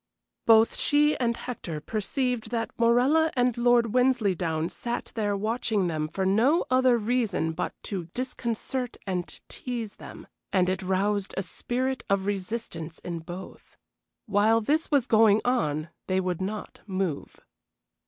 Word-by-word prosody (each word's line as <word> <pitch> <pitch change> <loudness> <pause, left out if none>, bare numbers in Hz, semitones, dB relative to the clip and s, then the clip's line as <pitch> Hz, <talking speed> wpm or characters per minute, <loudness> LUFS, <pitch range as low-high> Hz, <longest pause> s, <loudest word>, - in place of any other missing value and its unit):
Both 225 0 +6
she 295 +1 +3
and 235 -2 0
Hector 180 -10 -5
perceived 225 - -2
that 230 -1 -2
Morella 255 +8 +4
and 245 -2 +2
Lord 240 -2 +3
Wensleydown 190 -11 +1
sat 240 0 -4
there 205 -3 0
watching 215 -1 0
them 155 -3 -1
for 190 +4 -2
no 235 - +3
other 255 -1 +5
reason 220 -7 0
but 160 - -3
to 190 -5 -4
disconcert 245 +4 -4
and 180 -3 -2 0.2
tease 235 -5 -5
them, - - -10 0.3
and 185 -2 +3
it 185 0 -1
roused 195 +2 0
a 190 - 0
spirit 255 +8 -2
of 195 -1 +1
resistance 195 -5 -4
in 170 -1 -4
both. 175 +3 -10 0.5
While 215 +3 +3
this 300 +8 0
was 280 -5 +3
going 220 -3 +5
on 160 - 0 0.2
they 185 0 +1
would 185 -1 -2
not 205 +3 -5
move. 185 -6 -3
215 Hz, 140 wpm, -27 LUFS, 185-245 Hz, 0.5 s, Both